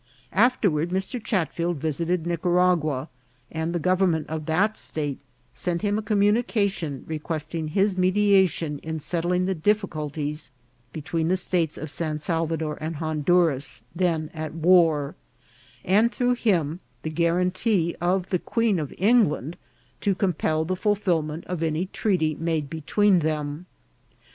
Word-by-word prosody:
Afterward 185 -10 +2
Mr. 190 +6 -3
Chatfield 170 -3 -1
visited 160 +3 -1
Nicaragua, 170 -4 +1 0.4
and 160 +1 -2
the 175 - -1
government 180 -2 +2
of 155 -1 -4
that 200 +7 +2
state 145 -8 -3 0.3
sent 170 - -2
him 205 0 +1
a - - -3
communication, 205 - +1
re 160 -1 -4
questing 155 0 -4
his 195 +5 +1
mediation 185 -5 +3
in 160 0 -5
settling 175 +3 0
the 190 - 0
difficulties 155 -5 -1 0.4
be 155 - -7
tween 160 +1 -1
the 185 +2 +2
states 175 -3 -1
of 155 -1 -6
San 155 -2 -2
Salvador 160 -1 -2
and 160 +1 -3
Honduras, 150 -5 +1
then 165 -3 0
at 155 -1 -5
war, 165 -4 +4 0.7
and 215 +6 +4
through 245 0 +1
him 175 -9 0 0.2
the 155 - -3
guarantee 180 +2 +1
of 180 +1 0
the 180 - +2
Queen 230 -4 +1
of 150 -3 -4
England 190 - +2 0.4
to 200 -2 +1
compel 160 -4 0
the 185 +3 -1
fulfilment 175 -6 0
of 180 -3 -4
any 160 +2 0
treaty 180 -5 0
made 160 -3 -1
between 185 +5 +2
them. 155 +1 -3
170 Hz, 135 wpm, -25 LUFS, 155-190 Hz, 0.7 s, war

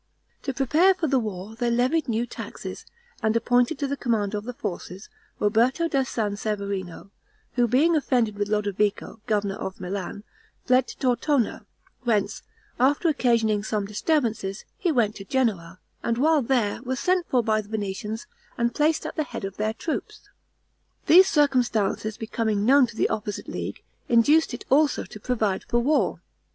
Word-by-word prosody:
To 270 - -3
prepare 315 +9 +4
for 355 - -2
the 275 -3 +2
war, 210 -1 -5
they 240 +1 0
levied 255 +5 +1
new 230 +1 0
taxes, - - -8 0.3
and 220 0 +1
appointed 245 +5 +2
to 285 - -2
the 280 +1 -2
command 220 -6 -1
of 210 0 -3
the 250 - -5
forces, 190 -3 -6 0.3
Roberto 235 +10 +2
da 275 -4 +1
San 220 -5 -2
Severino, 200 -3 -4 0.4
who 245 -1 +2
being 295 +8 +3
offended 245 -7 +1
with 205 0 -1
Lodovico, 210 +1 -1
governor 205 -2 0
of 190 - -6
Milan, 190 +2 -5 0.4
fled 255 +1 +3
to - - -9
Tortona, 255 0 0 0.3
whence, 225 -5 0 0.4
after 285 +6 +3
occasioning 230 -7 +2
some 210 -1 -1
disturbances, 215 -3 -1
he 355 - 0
went 230 -7 +2
to 195 - -8
Genoa, 195 -9 -1 0.2
and 230 - -1
while 305 +3 +3
there, 235 -5 0
was 255 0 -3
sent 365 +2 +1
for 250 -2 +2
by 215 -1 +1
the 205 - -17
Venetians, 210 +1 -4 0.3
and 235 0 +1
placed 305 +3 +1
at - - -5
the 310 - 0
head 220 - -6
of 195 0 -7
their 215 +1 -1
troops. 320 - -5 0.8
These 370 +3 +8
circumstances 240 -7 +1
becoming 220 -2 -1
known 270 +1 +6
to 230 - -11
the - - +1
opposite 210 -1 -4
league, - - -5 0.3
induced 290 +8 +4
it - - -10
also 295 +2 +3
to 215 - -11
provide 215 -4 -1
for 240 - -1
war. 290 +6 +1
230 Hz, 165 wpm, -25 LUFS, 210-270 Hz, 0.8 s, These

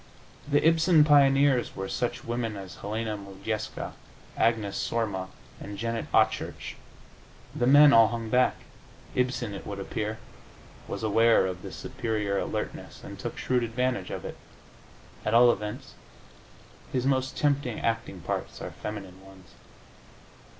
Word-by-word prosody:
The 145 +2 +3
Ibsen 165 -1 +5
pioneers 140 -3 +4
were 95 - -4
such 120 +3 -2
women 115 -2 -3
as 95 -3 -9
Helena 110 +1 -3
Modjeska, 100 +2 -5 0.4
Agnes 110 -3 +1
Sorma 105 -5 -1 0.3
and 100 0 -7
Janet 115 +2 -3
Achurch; - - +1 0.8
the 120 - +1
men 145 +2 +8
all 115 -1 +8
hung 115 0 -4
back. 125 0 +4 0.6
Ibsen, 125 -4 -1
it 95 - -7
would 100 - -5
appear, 110 +2 -3 0.7
was - - -5
aware 115 0 +4
of 90 -1 -4
this 95 -4 -8
superior 110 -6 -2
alertness - - -5
and - - -9
took - - -5
shrewd 125 -1 +1
advantage 120 -4 -1
of - - -5
it. - - -6 0.9
At 110 - +1
all 120 +1 +8
events, 105 -2 -5 1.0
his 125 -1 -1
most 130 -1 0
tempting 140 -5 0
acting 115 -5 -2
parts 70 - -4
are - - -6
feminine 95 -3 -7
ones. 95 -2 -16
115 Hz, 135 wpm, -28 LUFS, 100-125 Hz, 1.0 s, men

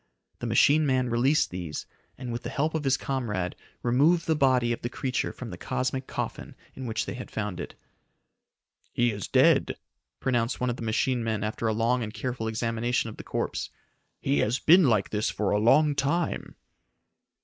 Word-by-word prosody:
The - - -3
machine 150 +1 +4
man 130 -2 +1
released 130 +6 +2
these, 90 -4 -5 0.3
and 125 -1 -6
with 120 +1 -4
the - - -5
help 155 +3 -1
of 155 -2 -2
his 135 -1 +3
comrade 105 -10 -2 0.3
removed 150 +8 +3
the 160 - +2
body 130 -4 +3
of - - -6
the 120 - -3
creature 130 +1 -2
from - - -8
the - - -8
cosmic 130 +1 -2
coffin - - -5 0.2
in 130 -1 -6
which 110 -1 -1
they - - -4
had 125 - -7
found 105 -5 -4
it. - - -6 1.2
"He 120 0 +2
is 100 -2 -5
dead!" - - +4 0.4
pronounced 120 -1 0
one 125 0 0
of 120 - -5
the - - -9
machine 120 +2 0
men 110 -2 -1
after 110 +2 -2
a 110 - +1
long 115 +3 +1
and 110 -2 -4
careful 120 0 -4
examination 115 +1 -1
of - - -13
the - - -8
corpse. - - -3 0.5
"He 70 - +1
has 110 - +1
been 175 +4 +6
like 110 -4 +1
this 105 0 0
for 105 - -1
a 105 - +2
long 145 +7 +5
time." 145 +5 -1
120 Hz, 190 wpm, -27 LUFS, 110-135 Hz, 1.2 s, been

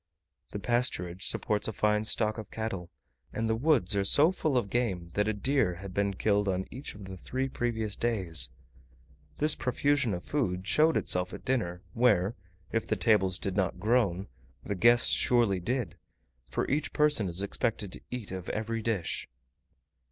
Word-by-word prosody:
The - - -4
pasturage 100 -5 -1
supports 105 -1 0
a - - -1
fine 105 0 +1
stock 110 0 +1
of 110 - -8
cattle, 100 -6 -4 0.4
and 115 0 -2
the 110 - +1
woods 120 - +2
are 100 - +2
so 145 - +5
full 155 -7 0
of 100 -5 -1
game 95 -9 -1
that 105 +1 +1
a - - +2
deer 120 -3 +1
had 95 +1 -9
been 100 0 0
killed 105 +1 +1
on 95 0 0
each 130 -1 -7
of 100 -1 -10
the 95 0 -7
three 130 +8 -3
previous 115 -5 -2
days. 95 -9 +2 0.9
This 150 +1 +3
profusion 140 -4 +1
of 90 - -7
food 95 -11 -1
showed 155 +8 +3
itself 90 0 0
at - - -12
dinner, 90 -9 -1
where, 115 -4 +3 0.4
if 115 - -1
the - - +1
tables 95 -6 +3
did 95 -1 -3
not 95 -2 0
groan, 100 -3 +1 0.4
the - - -3
guests 120 +5 +4
surely 115 -6 +3
did; 120 +5 -2 0.5
for - - -1
each 150 +3 -1
person 150 -9 +3
is 90 +3 0
expected 105 -1 -2
to - - -7
eat 125 -6 -5
of 95 -1 -6
every 115 +1 -2
dish. 105 - -2
105 Hz, 175 wpm, -29 LUFS, 95-120 Hz, 0.9 s, so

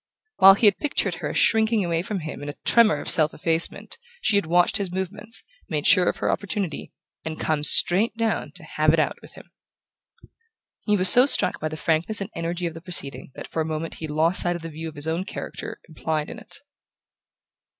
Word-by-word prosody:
While 195 0 +8
he 220 - 0
had 205 -2 +4
pictured 295 - -1
her - - -3
as - - -4
shrinking 220 -2 +2
away 170 -1 -1
from 195 0 -5
him 155 -3 -7
in 145 - -6
a 145 - -7
tremor 220 -10 +4
of - - -10
self 155 -1 +3
effacement 165 - -2 0.2
she 225 - +1
had 200 -5 +1
watched 175 +1 +3
his 195 -3 -3
movements, 205 +5 -5 0.3
made 150 -3 -3
sure 180 -1 +5
of - - -4
her - - -1
opportunity, 200 -5 -4 0.3
and 160 0 -6
come 155 -2 -1
straight 195 +9 +4
down 225 -1 -2
to - - -10
"have - - +1
it - - +2
out" - - -1
with - - -15
him. - - -16 1.3
He 210 -2 +2
was 185 0 +3
so 250 +6 +7
struck - - +1
by 155 - -3
the 155 0 -7
frankness 165 +7 0
and 200 +2 -6
energy 170 +1 -4
of 165 - -3
the 165 - -11
proceeding 160 -7 -3
that - - -8
for 160 - -3
a 160 0 -4
moment 160 +1 -5
he 160 - -5
lost 160 +4 +2
sight 175 0 -1
of 170 - -8
the 165 - -6
view 160 +1 -7
of 155 - -15
his 145 +2 -4
own 165 +3 -2
character 195 - -8
implied 155 -2 -4
in - - -9
it. - - -12
175 Hz, 220 wpm, -23 LUFS, 160-200 Hz, 1.3 s, While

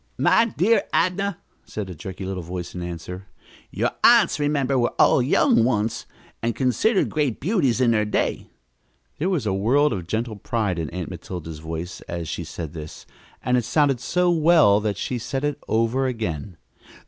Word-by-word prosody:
"My 230 - +4
dear 225 +1 +2
Adnah," 185 +2 +1 0.3
said 105 -3 -6
a 90 - -7
jerky 95 +4 -7
little 95 -1 -4
voice 90 +1 -6
in 90 - -5
answer, 90 +2 -7 0.4
"your - - -1
aunts, - - +6
remember, 140 -3 +1
were 120 - 0
all - - +5
young 155 - +3
once, 115 -2 0 0.3
and 115 -1 -1
considered 140 - +2
great 145 -7 0
beauties 150 - +1
in 125 -2 +4
their 110 -2 +2
day." 105 - -1 0.7
There 175 +6 0
was 165 - -1
a 100 - 0
world 125 +9 +2
of 90 -5 -5
gentle 110 +2 -2
pride 100 -4 -1
in 80 -3 -3
Aunt 90 0 -5
Matilda's 85 -2 -7
voice 80 +3 -6
as 85 -1 -4
she 85 - -4
said 80 -2 -7
this, 80 -2 -9 0.4
and 125 0 +2
it 120 - +1
sounded 135 +2 +2
so 180 +7 +1
well 160 -11 +5
that 105 -2 -2
she 125 +3 -3
said 135 +4 -3
it 145 -1 -1
over 115 +4 +1
again. 95 - -4
115 Hz, 175 wpm, -23 LUFS, 90-145 Hz, 0.7 s, aunts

